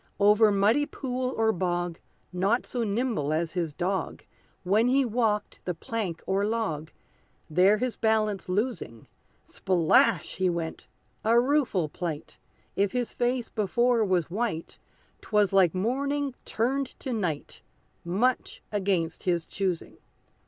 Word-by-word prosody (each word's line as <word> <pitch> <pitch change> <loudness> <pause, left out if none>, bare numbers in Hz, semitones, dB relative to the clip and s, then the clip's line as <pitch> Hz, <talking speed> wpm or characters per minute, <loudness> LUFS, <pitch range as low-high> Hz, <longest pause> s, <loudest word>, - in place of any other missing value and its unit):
Over 210 +1 +5
muddy 215 +9 +3
pool 255 -1 -3
or 225 0 +3
bog, 175 -2 -2 0.3
Not 195 +7 +1
so 245 -2 -2
nimble 215 - -1
as 160 +1 -1
his 170 -4 -1
dog, 185 +5 -3 0.4
When 210 +6 +3
he 265 +2 +3
walked 220 -3 0
the 180 - -3
plank 200 -4 -4
or 195 +1 +1
log, 205 -9 -2 0.6
There 185 +6 +5
his 250 +1 -2
balance 215 -4 +1
losing, 185 - -2 0.4
Splash! 175 -4 +2
he 185 0 +2
went 170 -2 -4 0.4
a 230 +2 +5
rueful 250 - +1
plight! 160 -1 -6 0.4
If 200 -1 +1
his 245 -2 -2
face 245 0 -1
before 235 +3 +2
was 180 -5 0
white, 205 -5 -3 0.4
'Twas 210 -2 +1
like 185 -3 +4
morning 275 +7 -1
turned 260 +4 -1
to 260 - -3
night, 175 -10 -3 0.4
Much 220 +9 0
against 190 -5 0
his 175 -3 0
choosing. 185 -4 -3
205 Hz, 130 wpm, -27 LUFS, 180-235 Hz, 0.6 s, Over